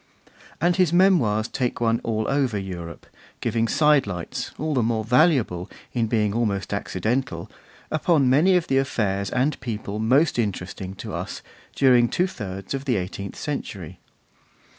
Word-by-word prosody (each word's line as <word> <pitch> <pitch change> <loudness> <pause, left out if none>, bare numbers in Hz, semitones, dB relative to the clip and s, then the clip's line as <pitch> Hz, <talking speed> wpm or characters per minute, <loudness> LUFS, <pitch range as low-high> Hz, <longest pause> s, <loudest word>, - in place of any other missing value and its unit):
And 175 +2 +2
his 180 -4 +3
Memoirs 160 - +3
take 125 -1 -2
one 115 -1 +1
all 110 -1 -1
over 135 -6 +1
Europe, 90 -4 -7 0.3
giving 115 0 0
sidelights, 130 - +1
all 155 0 -2
the 130 - +2
more 110 -1 0
valuable 125 - +2 0.2
in 115 -2 +1
being 105 -3 +1
almost 105 -5 -1
accidental, 110 -8 -2 0.4
upon 155 -3 +2
many 155 +9 +4
of 170 - -1
the 135 - +2
affairs 100 -7 -1
and 135 +3 0
people 105 -3 -4
most 130 +6 +3
interesting 95 -2 -3
to - - -7
us - - -5 0.3
during 125 -3 +5
two 180 - +1
thirds 100 - -6
of 135 0 -4
the 125 -4 +1
eighteenth 95 +1 -4
century. 100 - -5
120 Hz, 145 wpm, -24 LUFS, 100-140 Hz, 0.4 s, during